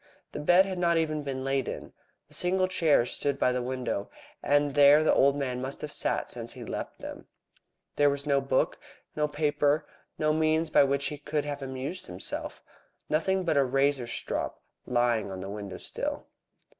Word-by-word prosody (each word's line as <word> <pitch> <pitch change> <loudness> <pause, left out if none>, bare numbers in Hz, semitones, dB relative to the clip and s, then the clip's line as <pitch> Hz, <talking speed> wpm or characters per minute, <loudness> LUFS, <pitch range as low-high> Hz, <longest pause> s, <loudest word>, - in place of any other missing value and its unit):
The - - -5
bed 175 +5 +5
had 190 -2 -4
not 170 -1 +3
even 155 -2 0
been 135 -2 -4
lain 135 -1 0
upon. - - -6 0.3
The - - -16
single 185 +1 +1
chair 165 -9 +3
stood 140 +2 0
by 125 - +2
the 125 0 -1
window, 125 -5 -3 0.3
and 145 0 +2
there 145 +1 +7
the - - +4
old 140 +1 +4
man 130 -3 -2
must 135 +2 -5
have 150 - -5
sat - - 0
since - - -6
he - - -9
left - - -6
them. - - -8 0.7
There 145 0 +5
was 140 +1 -2
no 140 -1 +2
book, 135 -1 0 0.4
no 150 0 +1
paper, 150 0 +1 0.3
no 155 0 +2
means 155 0 +1
by - - +6
which 140 +1 0
he 150 - -7
could 150 0 -2
have 145 -1 -4
amused 135 +7 -5
himself, 90 +1 -5 0.5
nothing 185 +5 +1
but 165 -4 +1
a 140 - +5
razor 135 -1 +1
strop - - -3 0.2
lying 120 -3 +1
on 95 - -6
the 95 +1 -6
window 100 -2 -6
sill. - - -4
145 Hz, 185 wpm, -28 LUFS, 130-155 Hz, 0.7 s, there